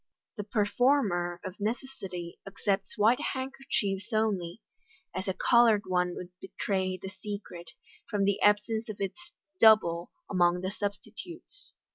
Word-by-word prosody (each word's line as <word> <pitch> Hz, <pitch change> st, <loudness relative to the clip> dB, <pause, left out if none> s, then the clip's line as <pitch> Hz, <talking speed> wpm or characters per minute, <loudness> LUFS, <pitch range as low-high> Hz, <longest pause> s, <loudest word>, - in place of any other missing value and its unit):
The 210 Hz, -, -4 dB
performer, 205 Hz, -4 st, +1 dB
of 185 Hz, +2 st, -7 dB
necessity, 205 Hz, -6 st, -4 dB
accepts 195 Hz, 0 st, -2 dB
white 220 Hz, +4 st, +4 dB, 0.2 s
handkerchiefs 250 Hz, -6 st, -2 dB
only, 210 Hz, -4 st, 0 dB, 0.5 s
as 190 Hz, -, -4 dB
a 190 Hz, -, -1 dB
coloured 235 Hz, -4 st, +5 dB
one 180 Hz, -1 st, 0 dB
would 180 Hz, -, -7 dB
betray 190 Hz, -1 st, -2 dB
the 190 Hz, -, -6 dB
secret, 200 Hz, -4 st, -7 dB, 0.4 s
from 205 Hz, -3 st, 0 dB
the 200 Hz, 0 st, +1 dB
absence 220 Hz, +2 st, +2 dB
of 210 Hz, -, -6 dB
its 345 Hz, -, -5 dB, 0.3 s
"double" 180 Hz, -6 st, +5 dB, 0.2 s
among 180 Hz, -2 st, +2 dB
the 185 Hz, +1 st, -2 dB
substitutes. 220 Hz, -, -7 dB
205 Hz, 125 wpm, -29 LUFS, 185-225 Hz, 0.5 s, coloured